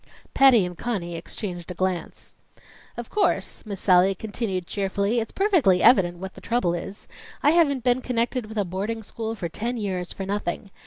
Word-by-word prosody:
Patty 255 -8 +6
and 180 0 -6
Conny 175 -5 -3
exchanged 175 +1 -6
a 180 - -5
glance. 185 -1 -3 0.6
"Of 240 -1 -7
course," 420 - 0
Miss 200 -3 -5
Sallie 185 0 +4
continued 205 -3 -3
cheerfully, 200 +4 -1
"it's 225 - -4
perfectly 325 - +3
evident 175 -8 +5
what 190 +2 -7
the - - -13
trouble 230 -8 0
is. 185 +4 -6 0.4
I 295 - +6
haven't 285 -7 +3
been 250 0 +2
connected 245 -1 -1
with 220 0 -8
a 205 - +1
boarding 205 +5 -3
school 225 +2 -5
for 180 -5 -4
ten 235 +9 -3
years 185 -5 -3
for 195 - -5
nothing. 200 0 -3
205 Hz, 175 wpm, -24 LUFS, 185-235 Hz, 0.6 s, Patty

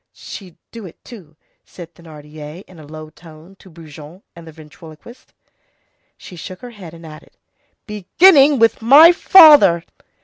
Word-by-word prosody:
"She'd 185 -5 -16
do 225 -4 -14
it, 170 - -20
too," 180 -11 -18 0.3
said 170 -2 -17
Thénardier 155 0 -16
in 180 -3 -22
a 150 - -18
low 155 0 -15
tone 165 +3 -21
to 190 - -22
Brujon 160 +1 -18
and 170 -1 -17
the - - -14
ventriloquist. 155 +8 -20 0.9
She 185 - -17
shook 180 +2 -14
her 245 - -14
head 180 -7 -16
and 165 0 -18
added:— 155 -1 -18 0.5
"Beginning 275 - 0
with 230 -1 -2
my 285 +9 +4
father!" 300 - +2
170 Hz, 145 wpm, -14 LUFS, 155-225 Hz, 0.9 s, my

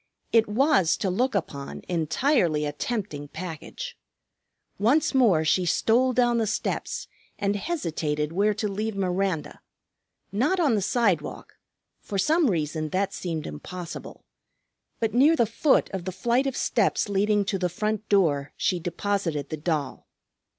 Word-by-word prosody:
It 225 -2 +4
was, 255 - +3
to 190 - -1
look 250 +7 0
upon, 140 -7 -4
entirely 170 - +1
a 145 - -1
tempting 155 -4 -4
package. 180 - -7 0.8
Once 265 +11 +3
more 210 -12 +4
she 180 +4 +3
stole 230 +9 +3
down 240 -1 +2
the 225 - +1
steps 210 - -2 0.3
and 200 0 0
hesitated 160 - -2
where 205 +4 +2
to 215 0 -1
leave 210 +2 -3
Miranda: 185 -3 -1 0.7
not 270 - +1
on 295 -8 +3
the 210 - +1
sidewalk, 195 -7 0 0.5
for 200 - -5
some 310 - +3
reason 155 -3 -1
that 190 +4 -1
seemed 165 -4 -4
impossible. 170 - -8 0.7
But 225 -2 0
near 285 +7 +5
the 235 - +3
foot 245 +6 +2
of 190 -2 -5
the 185 - -2
flight 235 +8 +1
of 270 - -2
steps - - +1
leading 205 +1 +2
to 195 -1 -1
the 180 -1 0
front 215 +4 -2
door 150 -8 +2
she 180 - +1
deposited 170 -4 -2
the 155 - -4
doll. 150 -4 -3
195 Hz, 145 wpm, -26 LUFS, 165-230 Hz, 0.8 s, near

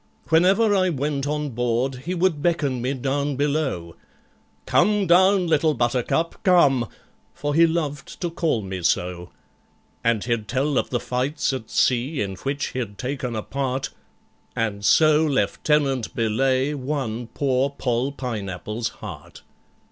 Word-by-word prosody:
Whenever 195 +7 +4
I 185 -1 +3
went 145 -2 -2
on 150 0 -2
board 120 +2 0
he 180 +2 -2
would 170 -4 +1
beckon 145 -7 0
me 130 +3 -1
down 140 +2 -1
below, 140 - -1 0.7
"Come 210 -1 +3
down, 185 +2 +5
Little 160 -2 +2
Buttercup, 125 +7 0
come" 140 - +4 0.5
(for 145 0 -2
he 165 +2 +6
loved 150 -4 -3
to 175 -2 -1
call 160 -10 0
me 95 -1 -5
so), 90 0 -1 0.7
And 115 -3 +1
he'd 115 -3 -1
tell 135 +3 +1
of - - -3
the 120 - 0
fights 135 +4 -1
at 120 -4 -5
sea 130 +4 +1
in 100 -2 -2
which 140 +7 -3
he'd 115 -6 -5
taken 125 -1 -3
a 110 - -3
part, 135 -1 -2 0.6
And 105 -3 -2
so 155 +7 +5
LIEUTENANT 140 -3 +1
BELAYE 130 +5 +1
won 130 -5 -3
poor 135 +1 0
POLL 130 -1 -1
PINEAPPLE'S 110 -3 -4 0.2
heart! - - -10
135 Hz, 140 wpm, -23 LUFS, 120-150 Hz, 0.7 s, he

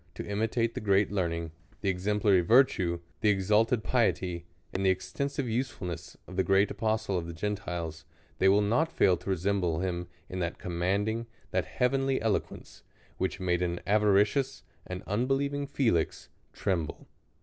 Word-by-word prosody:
to - - -5
imitate 110 +3 0
the - - -3
great 100 -1 +3
learning, 85 -4 -1 0.3
the 100 - 0
exemplary 100 +1 +2
virtue, 90 -5 +4 0.2
the 110 - +3
exalted 105 +4 +2
piety, 90 -8 0 0.3
and 95 - -1
the 95 - +4
extensive 140 +9 -2
usefulness 110 - -4
of 90 - -10
the 95 - +3
great 95 +2 +3
apostle 110 -4 0
of 85 - -6
the 85 - -6
Gentiles, 85 -4 -4 0.4
they 95 - +5
will 100 +2 +4
not 140 +11 +2
fail 95 - +4
to - - -8
re 95 - +2
semble 90 -2 0
him 90 -2 -2 0.2
in 90 - -5
that 85 -1 -2
commanding, 100 +6 -1 0.2
that - - +1
heavenly 135 +1 +1
elo 110 -1 +2
quence, - - -13 0.4
which 95 +1 -1
made 90 -1 0
aa 85 -1 0
avaricious, 105 +6 +2 0.2
an 90 0 -5
unbelieving 135 +6 0
Fe 135 -4 +2
lix, 80 -2 -1 0.2
tremble. 85 -5 -2
100 Hz, 160 wpm, -29 LUFS, 90-115 Hz, 0.4 s, they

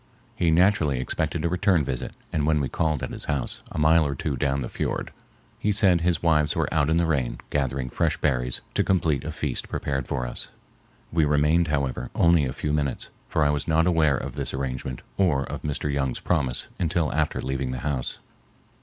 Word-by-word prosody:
He 85 - +2
naturally 80 -5 +3
expected 65 - -2
a - - +4
return 90 -1 +2
visit, 65 -2 -4 0.2
and 75 -1 +1
when 80 -1 +3
we 70 - 0
called 75 -4 0
at - - -3
his - - -6
house, 70 -4 -2
a - - -6
mile 80 +2 +5
or 70 -2 -1
two 70 +1 -2
down 70 0 0
the - - -3
fiord, - - -3 0.5
he 105 - +1
said 95 -5 +4
his 85 0 +1
wives 75 -3 +3
were - - +1
out 80 -2 +2
in 80 - +3
the 85 - +3
rain 65 -7 0
gathering 65 -2 -1
fresh - - 0
berries 60 -1 0
to - - +2
complete 80 -7 +1
a 80 - -4
feast 75 -4 -2
prepared 70 -3 -2
for 60 - -2
us. - - -5 0.6
We 80 -1 +3
remained, 75 +3 +3
however, 70 -4 -1
only 85 -3 +4
a 65 - -2
few 75 +3 -2
minutes, 70 -3 -1 0.2
for 80 - +2
I 75 - +4
was 75 -1 -2
not 80 0 +3
aware 80 -6 +3
of 65 0 -5
this 70 -1 -4
arrangement 65 -1 -4
or 80 -8 +3
of - - -6
Mr. 75 -1 -2
Young's 65 -3 -1
promise 70 -8 0
until 85 -1 0
after 75 -1 0
leaving 65 -1 -2
the 65 -1 -4
house. 70 -4 -2
75 Hz, 205 wpm, -25 LUFS, 65-80 Hz, 0.6 s, mile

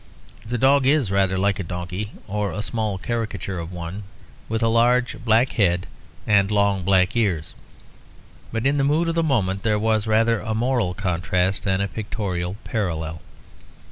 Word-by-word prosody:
The 120 +3 -3
dog 135 +2 +4
is 140 -8 +3
rather 95 -1 +2
like 100 +1 +1
a - - -2
donkey, 90 +4 -5 0.2
or 105 0 -2
a 105 - -4
small 110 -3 -2
caricature 100 -4 -3
of 85 +1 -6
one, 90 +3 -6 0.5
with 115 +1 -1
a - - +4
large 120 +2 +2
black 115 +3 +3
head 90 -5 +1 0.4
and 100 -1 +3
long 100 -2 +2
black 95 +3 +3
ears; 95 -9 0 1.0
but 115 +2 -2
in 140 +1 +2
the 140 - +2
mood 155 +4 +2
of - - 0
the 165 - +1
moment 100 - 0
there 105 -2 +1
was 110 0 +1
rather 115 +1 +3
a 110 +1 -3
moral 115 -6 0
contrast 90 0 0
than 95 0 +1
a 100 - 0
pictorial 100 -4 -4
parallel. 85 -7 -3
105 Hz, 170 wpm, -23 LUFS, 95-115 Hz, 1.0 s, dog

